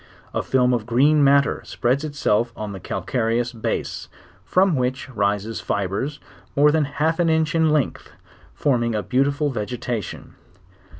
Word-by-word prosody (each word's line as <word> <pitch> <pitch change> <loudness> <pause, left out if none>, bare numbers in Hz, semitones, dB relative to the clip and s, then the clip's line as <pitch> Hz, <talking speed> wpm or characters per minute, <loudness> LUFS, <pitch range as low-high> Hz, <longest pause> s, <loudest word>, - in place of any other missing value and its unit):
A - - 0
film 125 -1 +2
of 115 -3 -1
Green 145 +5 +4
matter 140 0 +3
spreads 130 +5 -1
itself 120 -6 0
on 105 -1 -5
the 95 - -7
calcareous. 120 +4 -1
base, 115 - -3 0.3
from 185 - +3
which 130 0 -1
rises 105 -1 -1
fibres 100 +10 -2 0.4
more 150 +1 +5
than 155 -1 +2
half 155 +4 -1
an 170 -1 +3
inch 160 0 +1
in 160 -1 +3
length, 150 -4 0 0.5
forming 120 -5 +1
a 105 - -1
beautiful 140 +3 +1
vegetation.. 120 -1 -4
130 Hz, 140 wpm, -22 LUFS, 115-150 Hz, 0.5 s, more